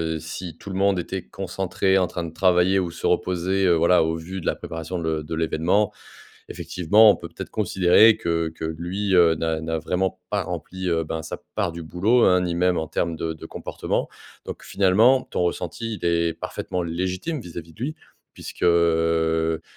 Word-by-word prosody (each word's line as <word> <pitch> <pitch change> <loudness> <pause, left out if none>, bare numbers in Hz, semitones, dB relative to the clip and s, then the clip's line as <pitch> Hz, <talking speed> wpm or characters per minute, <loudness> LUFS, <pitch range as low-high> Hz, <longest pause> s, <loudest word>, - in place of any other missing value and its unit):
heu, - - -4
si 80 +1 -7
tout 100 - -9
le - - -5
monde 100 0 +2
était 95 +2 -3
concentré, 95 0 0
en 90 - +1
train 85 - -5
de 85 - -6
travailler 90 +2 +3
ou 90 -2 -2
se - - -7
reposer. 95 +2 +1
Heu, 85 - +5
voilà, 85 +1 +4
au 80 +1 -1
vu 90 +4 -6
de - - -6
la - - +1
préparation 80 +2 -6
le 80 -2 -2
de 80 +2 -5
l'événement, 80 +5 +1 0.6
effectivement, 105 +5 +4
on - - 0
peut - - -9
peut-être - - -8
considérer 105 +2 +4
que 85 -4 -1
que 80 0 -7
lui, 90 +5 -3
heu, 85 -3 +5
n'a 80 0 -2
n'a 80 0 -2
vraiment 90 +4 -2
pas - - +1
rempli, 95 0 -5
heu, 80 -1 +1
ben 80 +1 -4
sa 80 - -6 0.2
part 85 - 0
du 85 0 -7
boulot, 100 +10 +2
hein. 90 0 +4
Ni 90 -1 -2
même 90 0 +2
en 80 - -3
termes 85 -1 -2
de 80 0 -3
de 80 - -11
comportement - - -3 0.4
donc - - -7
finalement 110 +7 +4
ton - - -2
ressenti, 90 +6 -3
il - - -4
est 85 -1 +1
parfaitement 90 +2 -4
légitime 90 - -3
vis-à-vis 85 -5 -9
de - - -21
lui, 155 +4 -3 0.4
puisque, - - -8
heu, 80 -1 +2
85 Hz, 195 wpm, -23 LUFS, 80-95 Hz, 0.6 s, Heu